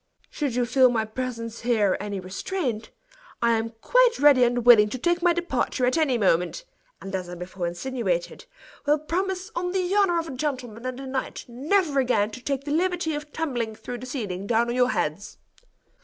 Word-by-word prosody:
Should 280 -6 -2
you 245 -1 +2
feel 255 +1 +5
my 225 -2 0
presence 230 0 -5
here 220 -5 +2
any 205 -1 -4
restraint, 225 - -3 0.5
I 235 0 +3
am 225 0 0
quite - - +4
ready 285 -4 +6
and 245 -1 +1
willing 215 -4 +8
to 255 - -4
take 345 +7 0
my 350 0 +4
departure 300 -7 -1
at 250 - +2
any 300 -6 +2
moment; 190 - +1 0.3
and 195 - -8
as 185 -2 -3
I 175 - -6
before 180 0 -5
insinuated, 180 -2 -3 0.4
will 295 +1 +4
promise, 370 +5 -3
on 360 +1 -2
the 370 0 0
honor 390 -4 +3
of 330 -1 -2
a - - -6
gentleman 255 -4 -4
and 255 0 -5
a 270 - -7
knight, 260 0 -4
never 290 +5 +1
again 220 -5 +1
to 250 - -9
take 275 +1 -2
the 290 - -5
liberty 345 0 0
of 295 0 -6
tumbling 245 -9 -2
through 245 +2 -7
the 255 - -8
ceiling 200 -7 -4
down 235 +1 +2
on 240 - -1
your 250 0 +3
heads." - - -2
255 Hz, 195 wpm, -25 LUFS, 225-310 Hz, 0.5 s, willing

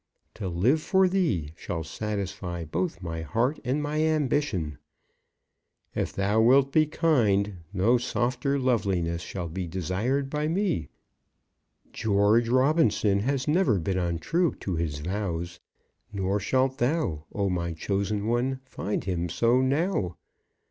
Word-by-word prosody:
To 105 -3 -5
live 115 - +2
for 190 +3 +3
thee 155 - 0
shall 80 0 -4
satisfy 95 -2 -4
both 85 +3 -3
my 80 -1 -4
heart 115 - 0
and 135 +4 0
my 150 +1 -1
ambition. 145 - 0 1.1
If - - -1
thou 100 +3 +1
wilt 135 +4 +5
be 155 +1 +4
kind, 105 - +2
no 105 +6 +3
softer 125 +3 0
loveliness 95 -10 0
shall 90 -1 -5
be 90 +2 -4
desired 95 - -1
by 150 +2 -1
me. 165 - 0 1.0
George 110 +3 +3
Robinson 130 -6 +3
has 130 +4 -1
never 150 - +3
been 95 +2 -1
untrue 90 - 0
to 95 - -2
his 80 -3 -2
vows, 90 -1 -3 0.5
nor 100 0 0
shalt 130 +6 +1
thou, 120 - 0
O 100 -1 -1
my 85 -2 -1
chosen 100 +5 -2
one, 125 +3 0
find 105 -5 -3
him 90 -2 -2
so 120 +8 +3
now. 135 - 0
105 Hz, 130 wpm, -27 LUFS, 90-135 Hz, 1.1 s, wilt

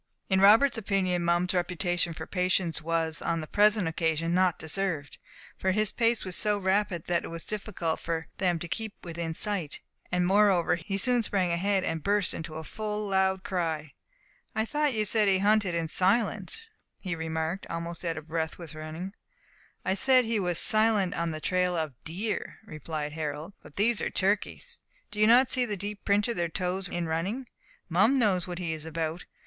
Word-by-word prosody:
In 190 -1 +3
Robert's 225 +5 +6
opinion, 185 -4 0
Mum's 175 +2 +2
reputation 175 -1 -1
for - - -6
patience 180 -3 0
was, 165 0 -1
on 165 - -1
the 155 - -5
present 210 +1 +3
occasion, 165 0 0
not 185 -1 +3
deserved; 160 -3 -2 0.4
for 190 - 0
his 215 +1 +1
pace 230 -2 +1
was 185 -2 -1
so 210 -1 +3
rapid 190 -3 0
that 175 -1 0
it - - -5
was 165 0 -7
difficult 200 -6 -3
for 165 -1 -3
them 180 -3 +2
to 175 - -5
keep 220 +4 -4
within 170 -1 -4
sight, 195 -8 -2 0.3
and 180 0 +2
moreover 195 -2 +4
he 175 +3 -3
soon 245 +4 +4
sprang 190 -5 0
ahead, 190 +3 +1
and 165 -3 -2
burst 200 +2 +1
into 160 -1 -6
a 160 - -5
full 210 +3 -4
loud 190 -1 +1
cry. 160 -5 -2 0.6
"I 220 0 +1
thought 295 0 0
you 215 -1 +1
said 210 +1 +3
that 195 - +5
he - - +3
hunted 205 -2 +2
in 165 -1 -1
silence," 200 - 0 0.4
he 185 -3 -3
remarked, 160 +3 -3
almost 170 +1 -5
out 165 -2 -2
of 155 0 -8
breath 160 0 -2
with 165 -3 -9
running. 155 +5 -6 0.7
"I 185 - +2
said 255 +5 +4
he 225 -1 0
was 180 -3 0
silent 215 -4 +4
on 170 -2 -1
the 155 -1 -4
trail 180 +3 +1
of 155 -4 -2
deer," 195 +7 -4
replied 155 -3 -5
Harold, 155 +3 -4
"but - - -15
these 220 +3 +2
are - - -1
turkeys. 210 - -1 0.3
Do 210 - -6
you 215 - +5
not 245 +3 +6
see 255 - +2
the 210 -4 -2
deep 205 +2 -6
print 205 0 +2
of 235 - -3
their 170 -1 0
toes 185 +2 -2
in 175 -1 -3
running! 185 +11 -2 0.4
Mum 200 +10 +3
knows 190 -7 +2
what 175 -1 -5
he 170 -3 -2
is 155 0 -6
about. 160 +1 -3
180 Hz, 190 wpm, -28 LUFS, 165-205 Hz, 0.7 s, Robert's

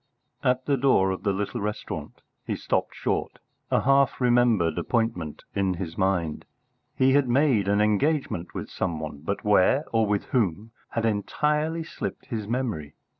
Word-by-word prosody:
At 125 0 +1
the 140 -1 +2
door 120 -8 +3
of 95 - -4
the 100 - +1
little 100 +1 -3
restaurant 105 +1 -5 0.2
he - - -2
stopped - - -1
short, - - -2 0.3
a - - +2
half 140 +1 +3
remembered 120 -9 +3
appointment 110 -10 -1
in 95 -2 0
his 85 -2 -5
mind. 90 -5 0 0.5
He 130 0 +4
had 140 -3 +3
made 125 -6 +3
an 100 +1 +3
engagement 105 - 0
with - - -4
some 80 -2 -2
one, 75 -2 -6
but 100 +5 -3
where, 105 +8 +4
or 115 -1 +3
with 105 -1 0
whom, 110 -2 0 0.2
had 115 -1 -1
entirely 150 +9 0
slipped 160 - -6
his 110 -5 -4
memory. 110 - -3
110 Hz, 160 wpm, -26 LUFS, 95-130 Hz, 0.5 s, He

